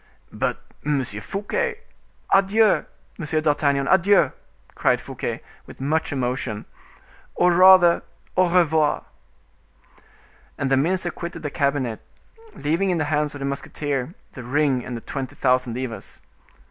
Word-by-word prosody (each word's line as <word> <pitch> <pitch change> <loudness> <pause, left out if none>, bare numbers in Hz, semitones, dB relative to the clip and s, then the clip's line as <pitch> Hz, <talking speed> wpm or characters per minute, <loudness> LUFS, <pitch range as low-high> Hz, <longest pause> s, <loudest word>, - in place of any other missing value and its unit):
"But, - - -1 0.2
Monsieur 130 -8 -1
Fouquet—" 465 - -2 0.5
"Adieu! 200 +2 +4 0.3
Monsieur 155 -1 0
d'Artagnan, 145 -2 +1
adieu!" 190 -5 +4 0.4
cried - - +2
Fouquet, - - -5 0.2
with - - -13
much 155 +5 0
emotion; 125 -5 -2 0.7
"or 180 0 +4
rather, 185 -1 +7 0.3
au 185 -1 +3
revoir." 160 -4 +2 1.5
And 140 -1 -2
the - - +5
minister 175 +5 0
quitted 170 -1 -7
the 145 - -3
cabinet, 140 -5 -1 0.5
leaving 165 +6 0
in 180 - +1
the 155 -1 -1
hands 150 0 0
of - - -7
the - - -2
musketeer 140 +2 -3 0.2
the 130 - -9
ring 135 0 +1
and 125 - -5
the - - -8
twenty 135 0 -6
thousand 125 -2 +1
livres. 125 -3 -6
150 Hz, 130 wpm, -23 LUFS, 135-175 Hz, 1.5 s, rather